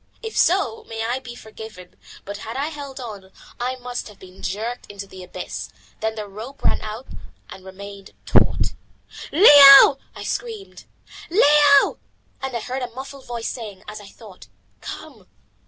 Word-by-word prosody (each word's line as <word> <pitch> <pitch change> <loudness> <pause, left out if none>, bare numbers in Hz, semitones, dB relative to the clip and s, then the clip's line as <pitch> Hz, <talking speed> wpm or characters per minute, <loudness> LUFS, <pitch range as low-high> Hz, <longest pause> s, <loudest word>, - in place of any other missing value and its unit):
If 445 - -6
so, 340 - +2
may 225 0 -5
I 245 +3 -1
be 245 -2 -10
forgiven, 220 -5 -12 0.3
but 200 +1 -6
had 225 +4 -7
I 285 +3 -1
held 285 -3 -8
on, 205 -6 -9 0.3
I 250 +2 -2
must 245 -1 -6
have 210 -2 -14
been 185 0 -15
jerked 225 +5 -4
into 200 -1 -8
the 190 -1 -12
abyss. - - -7 0.3
Then 220 0 -2
the 210 -2 -6
rope 220 +8 -10
ran - - +2
out 220 +4 -7 0.5
and 190 - -11
remained 195 +1 -11 0.2
taut. - - +2 0.6
"Leo!" 280 -5 +9 0.2
I - - -8
screamed, 445 -5 -6 0.4
"Leo!" 295 -5 +5 0.4
and 265 -2 -3
I - - -5
heard 255 +3 -4
a 250 - -4
muffled 265 +2 -10
voice 235 -1 -4
saying, 210 -6 -8
as 215 0 -8
I 205 - -13
thought, 195 - -15 0.3
"Come." - - -10
235 Hz, 160 wpm, -22 LUFS, 205-275 Hz, 0.6 s, Leo